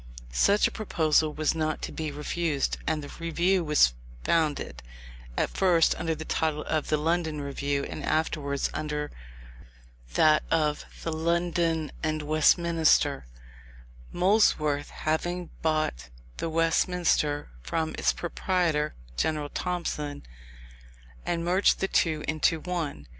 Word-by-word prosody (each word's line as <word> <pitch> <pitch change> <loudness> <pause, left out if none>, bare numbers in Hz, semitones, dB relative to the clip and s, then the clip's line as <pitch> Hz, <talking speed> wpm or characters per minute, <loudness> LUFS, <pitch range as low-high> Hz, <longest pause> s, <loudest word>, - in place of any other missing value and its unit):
Such 200 - +4
a - - -6
proposal 160 -7 +1
was 155 0 0
not 155 -1 -2
to - - -3
be 155 -2 -4
refused; 150 0 -1
and 155 -2 0
the 145 - -9
Review 175 +3 +1
was 150 - +4 0.3
founded, 150 - 0 0.6
at - - +1
first 175 -4 +3
under 165 -1 -1
the 155 +1 -7
title 155 -1 -1
of 155 -2 -1
the 155 - +2
London 160 0 0
Review, 140 0 -2
and - - -6
afterwards 150 -3 -1
under 150 -1 -3 1.0
that 155 0 +5
of 150 -2 +1 0.2
the 165 - -2
London 165 -1 0
and 155 -1 -1
Westminster, 155 - +3 0.8
Molesworth 175 -7 +2
having 175 +3 -2
bought 155 - -1 0.3
the 165 - -2
Westminster 165 -2 +1
from 160 - -2
its - - +2
proprietor, 170 -4 -1 0.2
General 150 - 0
Thompson, 150 -5 -3 1.0
and 170 -1 -1
merged 185 +3 +3
the 195 - 0
two 160 -5 +1
into 155 +2 +1
one. 160 - -4
155 Hz, 120 wpm, -27 LUFS, 150-170 Hz, 1.0 s, that